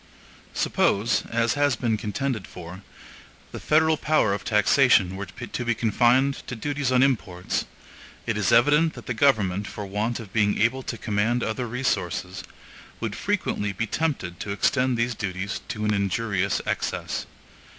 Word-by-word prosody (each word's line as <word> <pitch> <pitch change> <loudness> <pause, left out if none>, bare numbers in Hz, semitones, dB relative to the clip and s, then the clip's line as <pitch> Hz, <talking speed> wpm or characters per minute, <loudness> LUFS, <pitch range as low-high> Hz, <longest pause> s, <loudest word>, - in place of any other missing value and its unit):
Suppose, 110 +4 +1
as 115 0 +1
has 145 -2 +2
been 115 -1 0
contended 110 +1 -3
for, 90 +2 -10 0.7
the - - -6
federal 160 +1 +3
power 150 -11 +2
of 100 - -4
taxation 105 -3 +4
were 100 0 -5
to 120 +6 -6
be 120 -1 0
confined 125 +5 +2
to 125 - -4
duties 140 +3 -2
on 130 0 +5
imports, 95 -9 -1 0.6
it 115 - -1
is 105 +2 +1
evident 145 +7 +4
that - - -10
the 125 - -2
government, 105 -7 +2
for 105 - -6
want 105 +5 -2
of 105 -4 -10
being 105 -2 +2
able 120 +5 +2
to 120 - -5
command 110 +3 0
other 120 +3 -2
resources, 125 +3 -2 0.6
would - - -3
frequently 105 -1 -1
be 115 +5 -2
tempted 110 - -2
to - - -5
extend 125 +5 +1
these 120 +1 0
duties 100 -2 -4
to 105 0 -3
an 105 - +2
injurious 100 0 0
excess. - - -3
115 Hz, 155 wpm, -25 LUFS, 100-130 Hz, 0.7 s, on